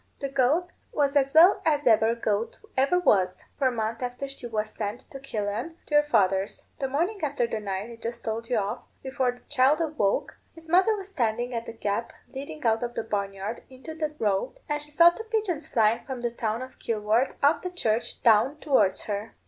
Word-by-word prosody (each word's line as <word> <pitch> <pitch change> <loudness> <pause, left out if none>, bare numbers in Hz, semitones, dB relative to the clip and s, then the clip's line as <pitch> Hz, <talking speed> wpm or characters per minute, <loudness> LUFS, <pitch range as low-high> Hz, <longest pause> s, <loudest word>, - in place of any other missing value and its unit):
The 275 - -4
goat 280 +7 +2 0.2
was 285 -1 +1
as 275 0 +2
well 345 +5 +7
as 295 -2 +1
e'er 225 -1 +4
goat 220 -1 -2 0.2
ever 275 +7 +3
was, 185 - +2 0.2
for 270 - +3
a - - +2
month 225 0 -3
after 250 +2 -4
she 270 -3 -8
was 215 -1 -2
sent 215 +3 -4
to 270 - -8
Killaan, 230 +4 -3
to - - -9
your 295 - +7
father's. 195 -8 +1 0.2
The 270 - -1
morning 340 +10 -1
after 285 -4 +1
the 225 -1 -3
night 200 +2 -4
I 230 - -10
just 235 +1 -6
told 225 +1 -4
you 245 - +2
of, 200 -1 -2 0.2
before 260 -1 0
the 245 - -20
child 285 +2 +3 0.2
woke, 200 -1 +1 0.2
his 325 0 -13
mother 375 +6 +4
was 395 -1 -7
standing 240 - -1
at 230 0 -4
the - - -6
gap 220 +1 -2 0.2
leading 280 +2 -7
out 225 -1 +3
of 240 0 -4
the - - -2
barn 200 -2 -2
yard 195 +4 -5
into 265 +5 -9
the 310 -1 -3
road, 205 - -1
and 295 0 -1
she 295 - -6
saw 335 +3 +7
two 345 - -8
pigeons 410 - -1
flying 225 -5 +2
from 260 -3 -6
the 240 -1 -1
town 230 0 -2
of 260 - -12
Kilworth 220 +3 0
off 295 +2 +4
the 365 - -3
church 235 -11 -2
down 235 +6 +4
towards 255 -11 +2
her. 210 +1 -4
245 Hz, 215 wpm, -27 LUFS, 220-295 Hz, 0.2 s, well